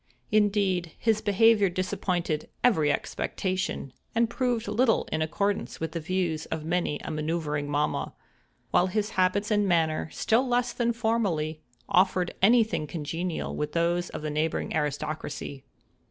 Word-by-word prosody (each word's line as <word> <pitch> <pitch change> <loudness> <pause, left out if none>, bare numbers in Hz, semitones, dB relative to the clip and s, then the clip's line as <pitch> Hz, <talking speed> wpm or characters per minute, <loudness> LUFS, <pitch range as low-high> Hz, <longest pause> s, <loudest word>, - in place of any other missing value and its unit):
Indeed, 200 -5 +2
his 220 -2 +1
behavior 210 0 +4
disappointed 180 -3 -2
every 160 -12 +4
expectation, 185 -5 -2 0.2
and 230 0 +2
proved 245 -3 0
little 225 +3 +2
in 155 - 0
accordance 200 +6 -1
with 160 - -3
the 170 - -3
views 170 -2 -1
of 160 -1 -4
many 170 -3 0
a - - -4
manoeuvering 150 -2 -2
mamma; 150 +1 -1 0.6
while 180 - +4
his 210 +3 -1
habits 195 +3 +1
and 205 -1 +3
manner, 160 -3 +1
still 240 +4 +2
less 245 0 +1
than 235 -1 +1
formerly, 200 -10 0 0.3
offered 185 -1 +2
any 230 +4 +6
thing 185 -8 -3
congenial 165 +3 -3
with 150 0 -3
those 175 +1 +1
of - - -7
the 155 - -2
neighboring 155 +2 -1
aristocracy. 150 -2 -3
180 Hz, 140 wpm, -27 LUFS, 155-210 Hz, 0.6 s, any